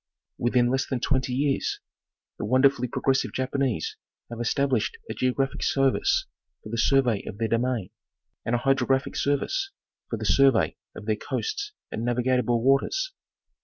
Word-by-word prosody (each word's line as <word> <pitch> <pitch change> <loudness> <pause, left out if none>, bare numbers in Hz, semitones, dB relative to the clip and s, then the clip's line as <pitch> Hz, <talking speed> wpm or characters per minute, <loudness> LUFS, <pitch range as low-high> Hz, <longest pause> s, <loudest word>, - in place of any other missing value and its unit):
Within 120 0 +2
less 135 +1 0
than 130 - -1
twenty 130 +1 0
years, 135 +2 0 0.6
the - - -2
wonderfully 130 +2 +3
progressive 135 +2 0
Jap 130 0 -2
anese 130 - 0 0.4
have 115 - -6
established 140 - 0
a - - -2
geographic 130 +2 -1
service 135 -1 +2 0.4
for - - -9
the 115 - -3
survey 125 -5 +3
of 100 - -6
their 115 +1 0
domain, 115 -4 0 0.5
and 115 - 0
a - - +3
hydrographic 135 +1 +1
service 145 - 0 0.4
for - - -2
the - - -5
survey 135 -4 +4 0.2
of 105 - -9
their 110 -1 0
coasts 140 - -3 0.2
and 110 - -3
navigable 120 -1 +1
waters. 320 - +2
130 Hz, 150 wpm, -26 LUFS, 120-135 Hz, 0.6 s, survey